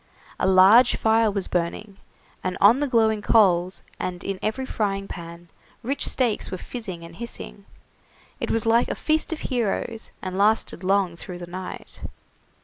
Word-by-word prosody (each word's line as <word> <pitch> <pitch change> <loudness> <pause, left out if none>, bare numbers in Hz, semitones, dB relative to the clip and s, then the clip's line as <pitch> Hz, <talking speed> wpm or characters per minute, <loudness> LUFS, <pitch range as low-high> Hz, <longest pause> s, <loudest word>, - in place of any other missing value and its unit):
A - - +1
large 195 +6 +6
fire 225 0 +3
was 200 -2 -3
burning, 180 +3 -3 0.5
and 185 0 -2
on 220 +6 +6
the 290 - 0
glowing 220 -4 +2
coals, 185 -5 +3 0.2
and 180 -1 -4
in 195 -1 -4
every 260 +5 -2
frying 195 -5 -2
pan 170 -1 -9 0.4
rich 275 +5 0
steaks 245 -5 0
were 185 - -4
fizzing 190 -5 -7
and 165 0 -12
hissing. 230 -3 -7 0.7
It - - -3
was 225 -1 0
like 230 +1 +3
a - - -3
feast 315 +2 0
of 325 - -4
heroes, 230 -1 -2
and 185 0 -5
lasted 210 -3 +1
long 190 -2 +1
through 175 +1 -8
the 175 - -7
night. 180 +1 -8
200 Hz, 160 wpm, -24 LUFS, 185-225 Hz, 0.7 s, large